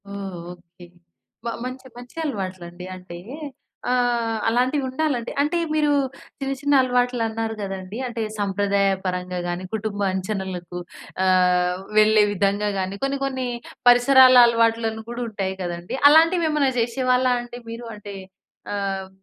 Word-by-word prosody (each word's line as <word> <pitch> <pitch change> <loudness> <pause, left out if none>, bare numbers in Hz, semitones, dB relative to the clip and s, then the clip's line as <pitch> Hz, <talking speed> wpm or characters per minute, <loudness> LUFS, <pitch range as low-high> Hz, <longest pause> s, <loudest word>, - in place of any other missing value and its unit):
ఓహ్! 200 -2 -6 0.2
Okay. 175 0 -15 0.6
మ - - -2 0.2
మంచి 255 +1 -7
మంచి 245 0 -12
అలవాట్లు 190 - -4
అండి. 175 +1 -10
అంటే 180 -2 -10 0.7
ఆహ్, 240 -3 +1
అలాంటివి 255 +5 +1
ఉండాలండి. 260 -3 -1
అంటే 300 +4 +1 0.2
మీరు 300 -1 +2 0.5
చిన్న, 270 -1 -2
చిన్న 285 +1 +1
అలవాట్లన్నారు 240 -3 0
కదండీ. 195 +1 -5
అంటే 235 -1 -4 0.2
సంప్రదాయపరంగా 195 -2 0
గానీ, 175 +1 -3
కుటుంబ 215 -1 -4
అంచనలకు 185 -2 -4 0.5
ఆహ్, 180 -1 +3 0.2
వెళ్ళే 215 0 +6
విధంగా 200 +1 +1
గానీ 190 +1 -3
కొన్ని, 275 0 0
కొన్ని 260 -2 -2 0.4
పరిసరాల 255 +1 +7
అలవాట్లను 230 -1 +1
కూడుంటాయి 220 -6 -3
కదండీ. 175 +2 -4
అలాంటివేమైనా 315 -2 +4
జేశేవాళ్ళా 250 +2 +2
అండి 240 0 -8
మీరు? 230 +1 -7
అంటే 205 -1 -9 0.6
ఆహ్, 195 -1 -2
220 Hz, 120 wpm, -23 LUFS, 190-250 Hz, 0.7 s, పరిసరాల